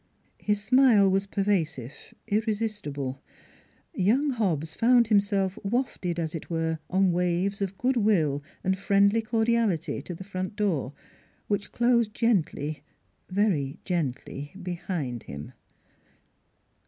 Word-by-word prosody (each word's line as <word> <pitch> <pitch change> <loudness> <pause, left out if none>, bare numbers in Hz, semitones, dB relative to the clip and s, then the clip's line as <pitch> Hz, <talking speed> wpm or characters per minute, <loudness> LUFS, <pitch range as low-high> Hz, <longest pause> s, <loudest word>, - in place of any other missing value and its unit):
" - - -40
His 205 0 +2
smile 230 -5 +5
was 195 +1 +1
pervasive, 180 - -1 0.3
irresistible. 205 - -2 0.7
Young 255 +10 +2
Hobbs 165 - -1
found 235 +1 +4
himself 200 -2 +2
wafted, 195 -6 -1
as 160 -2 -2
it 165 - -6
were, 165 -1 -1
on 190 0 +3
waves 180 +3 0
of 195 -1 -2
good 255 +1 +1
will 165 -10 +2 0.2
and 190 0 0
friendly 200 +2 +3
cordiality 225 -5 0
to 175 - -7
the 190 - -8
front 185 0 -5
door, 170 - 0 0.5
which 205 -1 -2
closed 235 -3 +2
gently 155 - 0 0.5
very 185 -9 +1
gently 145 -2 -3
behind 170 - -3
him. 70 +1 -7
195 Hz, 115 wpm, -27 LUFS, 165-215 Hz, 0.7 s, smile